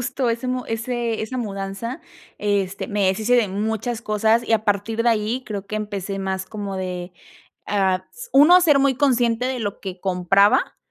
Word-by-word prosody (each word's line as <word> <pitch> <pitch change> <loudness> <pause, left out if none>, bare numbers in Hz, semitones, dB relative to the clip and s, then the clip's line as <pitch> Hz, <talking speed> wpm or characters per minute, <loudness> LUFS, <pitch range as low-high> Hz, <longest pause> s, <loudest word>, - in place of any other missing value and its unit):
justo 245 0 -1
ese 235 +2 -3 0.4
ese 235 -2 -2
esa 255 +4 -4
mudanza, 200 +4 -5 0.4
este, 200 -2 -1
me 205 -2 +1
deshice 215 +6 +1
de 235 -4 +3
muchas 220 +4 -2
cosas 220 +2 +2
y - - 0
a 220 -1 +2
partir 210 +3 0
de 240 - +3
ahí 225 +3 0
creo 205 -4 -5
que 215 - -4
empecé 200 -2 -4
más 190 -1 -3
como 200 -1 -5
de, 180 -1 -5 0.5
ah, 190 -2 +1
s - - -10
1 335 +6 +7
ser 300 -5 +4
muy 275 -1 +3
consciente 245 -3 +2
de 260 -1 -2
lo 205 -2 -4
que 185 -2 -7
compraba, 195 +2 +2
215 Hz, 175 wpm, -22 LUFS, 195-240 Hz, 0.5 s, 1